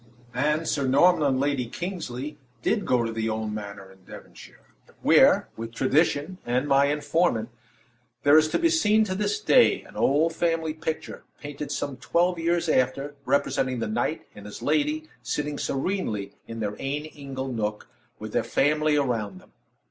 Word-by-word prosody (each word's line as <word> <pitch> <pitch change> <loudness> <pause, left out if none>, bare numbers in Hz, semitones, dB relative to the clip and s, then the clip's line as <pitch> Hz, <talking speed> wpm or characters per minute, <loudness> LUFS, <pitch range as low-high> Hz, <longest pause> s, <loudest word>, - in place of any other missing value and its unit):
And 150 +5 0
Sir 140 -3 0
Norman 165 +7 +5
and 130 -1 +1
Lady 140 -3 0
Kingsley 150 -4 -5 0.2
did 220 -2 0
go 125 -2 +3
to 115 - -2
the 115 0 -2
old 110 -1 -3
manor 100 -2 -7
in 95 -1 -21
Devonshire, - - -14 0.3
where - - +5
with 115 +1 -7
tradition 150 +6 +1
and 125 +4 0
my 140 0 +4
informant 145 -4 0 0.7
there 145 +1 +6
is 155 0 +6
to - - 0
be 335 0 +3
seen 220 -9 +4
to 195 -3 -2
this 310 - -1
day, - - +4
an - - -16
old 155 +4 +2
family 165 -2 0
picture, 160 0 -5 0.2
painted 145 0 -6
some 140 -2 -3
twelve 170 +9 +1
years 170 +1 0
after, 140 0 +1
representing 135 -2 +1
the 115 - -2
knight 215 -7 -1
and 105 0 -11
his 105 - -9
lady 155 +1 0
sitting 145 +5 -3
serenely 135 - -2
in 115 0 -6
their 105 -1 -2
"ain 145 +3 -3
ingle 135 -3 -6
nook" 105 -2 -3 0.3
with - - -8
their - - +1
family 150 +2 +2
around 110 -9 -1
them. - - -22
145 Hz, 165 wpm, -26 LUFS, 120-160 Hz, 0.7 s, there